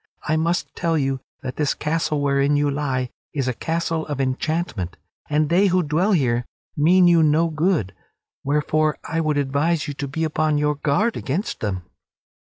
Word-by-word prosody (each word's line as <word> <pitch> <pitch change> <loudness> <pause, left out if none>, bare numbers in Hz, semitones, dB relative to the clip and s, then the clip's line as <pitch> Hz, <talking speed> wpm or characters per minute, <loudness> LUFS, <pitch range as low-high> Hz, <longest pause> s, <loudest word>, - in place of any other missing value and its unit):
I 155 - +2
must 165 +2 -1
tell 165 -2 0
you 135 -2 0 0.2
that 130 -1 -5
this 150 -2 +1
castle 150 -1 -1
wherein 140 0 +2
you 145 0 +2
lie 135 -3 -2 0.2
is 135 -3 -1
a 130 - 0
castle 165 +3 -2
of 145 -2 -4
enchantment, 130 - -2 0.3
and 150 +1 +2
they 185 +6 +4
who 185 -1 +2
dwell 170 +7 +1
here 125 -7 +2 0.3
mean 180 +5 +5
you 170 -1 +5
no 160 +2 +3
good; 155 - 0 0.5
wherefore 150 +2 +1
I 165 +1 -1
would 155 -2 0
advise 145 +4 0
you 145 - -3
to 140 0 -4
be 160 +4 -3
upon 155 -1 +1
your 150 0 +2
guard 150 +11 0
against 165 - -3
them." 95 -4 -3
150 Hz, 175 wpm, -22 LUFS, 140-165 Hz, 0.5 s, mean